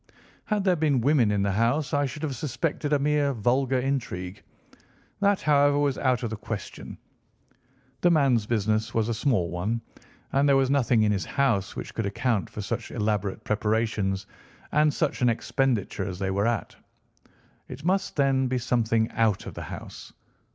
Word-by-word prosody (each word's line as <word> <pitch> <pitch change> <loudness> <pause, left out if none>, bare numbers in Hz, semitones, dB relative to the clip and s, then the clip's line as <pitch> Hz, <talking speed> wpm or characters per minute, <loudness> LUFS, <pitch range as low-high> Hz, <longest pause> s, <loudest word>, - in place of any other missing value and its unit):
"Had 210 -2 0
there 185 -2 +3
been 150 -5 +2
women 130 -3 +3
in 100 -1 +1
the 100 - +1
house, 120 +8 +1
I 145 -1 +2
should 150 +4 -8
have 140 -4 -2
suspected 145 +3 -2
a 145 - +4
mere 145 0 +1
vulgar 130 +3 +1
intrigue. 115 -9 -3 0.8
That, 200 -1 +2
however, 145 -1 +4
was 145 -2 +1
out 130 -2 +1
of 115 - -2
the - - -2
question. 105 - -7 1.0
The 175 - +5
man's 135 -9 +3
business 110 -1 0
was 115 0 +1
a - - +1
small 110 -7 0
one, 100 +7 -1 0.5
and 140 +1 +3
there 140 - +5
was 135 0 +2
nothing 125 -5 +3
in 105 - +3
his 100 -2 -1
house 115 -9 0
which - - -6
could 115 -3 -2
account 105 -2 -1
for 105 - -6
such 115 +3 -4
elaborate 105 -3 -2
preparations, 105 -2 0 0.5
and 150 0 +4
such 145 -2 -1
an 125 - +4
expenditure 115 -4 -1
as 95 -2 -5
they 95 0 -2
were 100 +3 +1
at. 120 -1 -2 0.9
It 145 - -9
must, 190 +2 0
then, 135 -2 +2
be 130 0 0
something 115 -2 +1
out 110 -4 +1
of - - -7
the - - -7
house. - - -9
120 Hz, 175 wpm, -26 LUFS, 105-140 Hz, 1.0 s, The